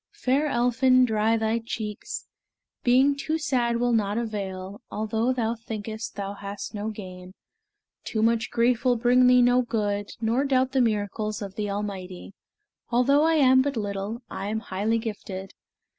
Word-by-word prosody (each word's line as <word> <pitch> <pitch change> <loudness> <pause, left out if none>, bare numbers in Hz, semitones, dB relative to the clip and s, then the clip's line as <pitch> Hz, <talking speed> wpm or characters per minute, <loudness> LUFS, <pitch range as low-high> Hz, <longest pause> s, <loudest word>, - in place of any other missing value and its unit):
Fair 275 +4 +1
Elphin, 255 0 +3
dry 220 0 +2
thy 220 +1 0
cheeks! 215 -2 -5 0.6
Being 260 +3 +4
too 310 +3 -2
sad 245 -6 0
will 245 0 +1
not 210 -1 +1
avail, 200 -4 -4
Although 220 +3 -1
thou 230 -3 0
thinkest 220 -1 -6
thou 200 -1 -4
hast 200 0 -7
no 210 +1 -3
gain. 185 -3 -9 0.7
Too 220 -1 -1
much 230 0 +2
grief 235 0 +1
will 250 -2 +3
bring 250 +2 +4
thee 250 0 +6
no 245 +1 +4
good; 205 -4 -2
Nor 230 +4 +1
doubt 260 -1 +2
the 265 -1 +2
miracles 215 -1 -1
of 195 -1 -7
the 210 0 -3
Almighty: 195 -2 -5 0.6
Although 250 +4 +3
I 325 +1 +3
am 260 -3 +5
but 280 -1 -2
little, 205 +3 -4
I 195 - -5
am 220 +1 -2
highly 215 +3 -1
gifted. 200 -4 -6
225 Hz, 160 wpm, -26 LUFS, 205-250 Hz, 0.7 s, thee